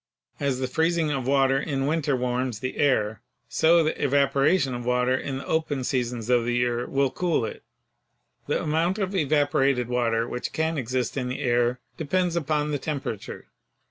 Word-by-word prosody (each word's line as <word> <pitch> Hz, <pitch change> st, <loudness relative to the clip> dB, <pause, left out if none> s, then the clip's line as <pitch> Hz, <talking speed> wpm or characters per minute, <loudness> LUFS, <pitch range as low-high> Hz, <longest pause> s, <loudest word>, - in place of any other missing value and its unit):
As 140 Hz, -3 st, 0 dB
the 130 Hz, 0 st, -2 dB
freezing 160 Hz, +2 st, +1 dB
of 135 Hz, -3 st, -2 dB
water 135 Hz, -1 st, +3 dB
in 135 Hz, -2 st, -2 dB
winter 150 Hz, -2 st, +1 dB
warms 125 Hz, -1 st, -1 dB
the 130 Hz, 0 st, -4 dB
air, 110 Hz, -7 st, +1 dB, 0.3 s
so 165 Hz, +1 st, +4 dB
the 155 Hz, -, +1 dB
evapora 140 Hz, +4 st, +2 dB
tion 135 Hz, -5 st, -1 dB
of 120 Hz, 0 st, -4 dB
water 125 Hz, +1 st, +1 dB
in 135 Hz, 0 st, -3 dB
the 135 Hz, -, -7 dB
open 150 Hz, -4 st, -1 dB
seasons 125 Hz, -3 st, -2 dB
of 120 Hz, -1 st, +3 dB
the 120 Hz, +1 st, -1 dB
year 120 Hz, 0 st, 0 dB
will 135 Hz, -1 st, +1 dB
cool 170 Hz, -10 st, 0 dB
it. -, -, -7 dB, 0.9 s
The -, -, 0 dB
amount 165 Hz, +5 st, +1 dB
of 195 Hz, -2 st, -2 dB
evaporated 140 Hz, -5 st, +2 dB
water 115 Hz, -2 st, +1 dB
which 125 Hz, -, -4 dB
can 160 Hz, -1 st, 0 dB
exist 125 Hz, 0 st, -2 dB
in 125 Hz, -2 st, -1 dB
the 125 Hz, +3 st, -4 dB
air 120 Hz, -1 st, +1 dB, 0.2 s
depends 175 Hz, +2 st, 0 dB
upon 150 Hz, -2 st, 0 dB
the 145 Hz, -, -1 dB
temperature. 135 Hz, -8 st, -5 dB
135 Hz, 175 wpm, -25 LUFS, 125-155 Hz, 0.9 s, so